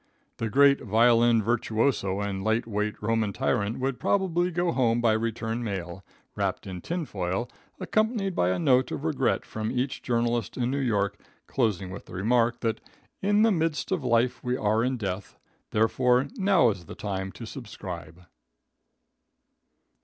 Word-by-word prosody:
The 115 - -2
great 140 +3 +5
violin 115 +1 +4
virtuoso 110 -3 0
and 100 -2 -3
light 110 +2 +1
weight 105 -1 -2
Roman 110 -1 +1
tyrant 115 -4 0
would 130 -1 -2
probably 180 -3 +1
go 175 0 0
home 120 -4 +2
by 115 -2 +3
return 115 +1 -2
mail, 95 -3 -5 0.3
wrapped - - -2
in 90 -2 -6
tinfoil, 120 - -3 0.3
accompanied 215 -3 0
by 90 - +2
a 90 - +1
note 125 +8 +3
of - - -4
regret 150 -5 0
from 110 0 -4
each 130 +1 -2
journalist 120 -2 -1
in 125 0 0
New 140 - -1
York, 100 -6 0 0.3
closing 100 -7 -1
with 100 - -9
the - - -12
remark, 120 +4 +1
that 115 -1 -1 0.4
"in 205 +2 +3
the 225 - +5
midst 160 -4 -1
of 180 -7 0
life 120 0 +1
we 125 0 0
are 110 +1 +1
in 130 +1 0
death, 100 -3 -5 0.3
therefore 125 +4 +2
now 190 - +4
is 95 -4 -8
the - - -9
time 95 -2 -4
to 115 - -8
subscribe." 90 - -8
115 Hz, 155 wpm, -27 LUFS, 105-130 Hz, 0.4 s, great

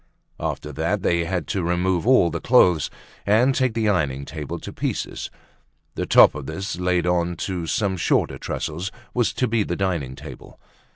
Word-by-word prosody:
After 75 - -4
that 85 +7 -1
they 85 -1 +1
had 90 +1 -2
to 100 - -1
remove 90 +2 0
all 125 -10 +5
the 85 - -4
clothes 90 - +4 0.3
and 115 +6 +3
take 130 -3 0
the 110 -2 +1
ironing 70 -9 0
table 75 0 -6
to - - -8
pieces; - - -3 0.6
the - - -3
top - - +7
of 70 -2 -7
this 95 0 -4
laid 90 -1 +1
on 90 -1 +1
to 90 -4 -3
some 95 +5 0
shorter - - +1
trestles 85 +5 -4 0.2
was 120 -2 +1
to 125 - 0
be 115 -1 +1
the - - -2
dining 85 -10 -2
table. - - -11
90 Hz, 175 wpm, -23 LUFS, 80-100 Hz, 0.6 s, top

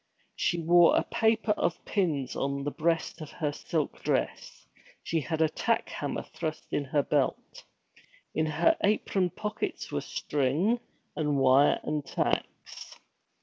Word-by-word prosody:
She 175 - 0
wore 170 +1 +5
a - - +3
paper 220 -1 +1
of 170 -4 -1
pins 155 - -1
on 140 0 -2
the 145 - -2
breast 165 +1 -1
of 155 - -7
her 150 -4 -1
silk 155 0 -3
dress, - - -2 0.4
she 165 -1 0
had 160 +2 0
a - - +4
tack - - -1
hammer - - -3
thrust 155 -1 -5
in 145 - 0
her 145 +1 +1
belt. - - -1 0.7
In 155 0 +1
her 325 - +3
apron 200 -3 +2
pockets 210 +5 -4
were - - -1
string, 150 - 0 0.4
and 150 -2 0
wire, 135 +2 +5
and 150 -1 -2
tacks. - - -3
160 Hz, 145 wpm, -29 LUFS, 145-185 Hz, 0.7 s, wore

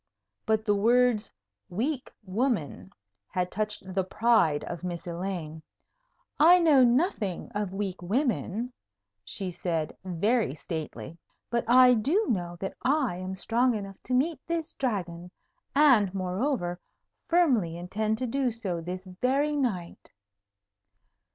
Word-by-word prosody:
But 220 0 +1
the 205 - +3
words 230 +1 +3 0.4
"weak 255 - -2
woman" 185 - -2 0.4
had 180 -1 -2
touched 215 0 -2
the 190 0 +1
pride 185 -7 +2
of 170 +1 -6
Miss 175 -2 -4
Elaine. 170 -3 -5 0.8
"I 340 +4 +8
know 310 -7 +5
nothing 240 - +1
of 205 -2 -2
weak 195 -2 -4
women," 235 +2 -1 0.5
she 180 - -4
said, 165 -3 -2
very 190 - 0
stately; 160 +1 -6 0.3
"but 235 0 0
I 250 +1 +7
do 290 - +2
know 175 -5 -2
that 195 - -4
I 265 - +1
am 185 +1 -5
strong 235 +5 +1
enough 195 -2 -7
to 250 - 0
meet 310 +6 +1
this 335 -2 -2
Dragon, 180 -8 -3 0.5
and, 255 -10 +5
moreover, 185 0 -1 0.5
firmly 250 - +2
intend 215 +5 -2
to 255 - -2
do 260 +2 0
so 195 -7 -4
this 180 +2 -5 0.2
very 280 +4 +2
night." 205 -12 -3
210 Hz, 125 wpm, -28 LUFS, 180-255 Hz, 0.8 s, I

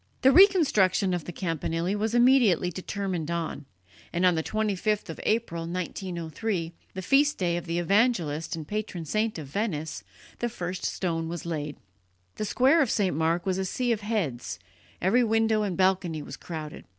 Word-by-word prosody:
The 265 - +7
reconstruction 265 - +5
of 175 -3 -2
the - - -5
campanile 165 +1 -2
was 220 +2 -1
immediately 240 -8 +4
determined 185 -3 -3
on, 165 -4 -3 0.5
and 175 +2 +1
on 180 - +5
the 160 - 0
25th 210 +1 -1
of - - -9
April, 170 -7 -1
1903, 175 +1 -3 0.2
the 190 - -4
feast 285 - +3
day 175 -2 0
of 175 0 -4
the 170 +1 -1
evangelist 175 -5 +1
and 155 -2 -7
patron 210 -5 -4
saint 215 +5 0
of 155 - -6
Venice, 155 - -3 0.4
the 240 - -1
first 180 -5 -5
stone 165 -3 -2
was 170 0 -5
laid. 150 -3 -4 0.6
The 215 - -2
square 265 +9 +4
of 270 - +2
St. 195 -8 +1
Mark 165 +2 +1
was 190 -1 0
a - - 0
sea 245 +6 -1
of 225 -2 0
heads; 200 - -2 0.5
every 235 +7 +4
window 225 -1 +2
and 195 -4 -2
balcony 185 -5 +1
was 135 - -8
crowded. 155 -2 -7
185 Hz, 170 wpm, -27 LUFS, 165-220 Hz, 0.6 s, The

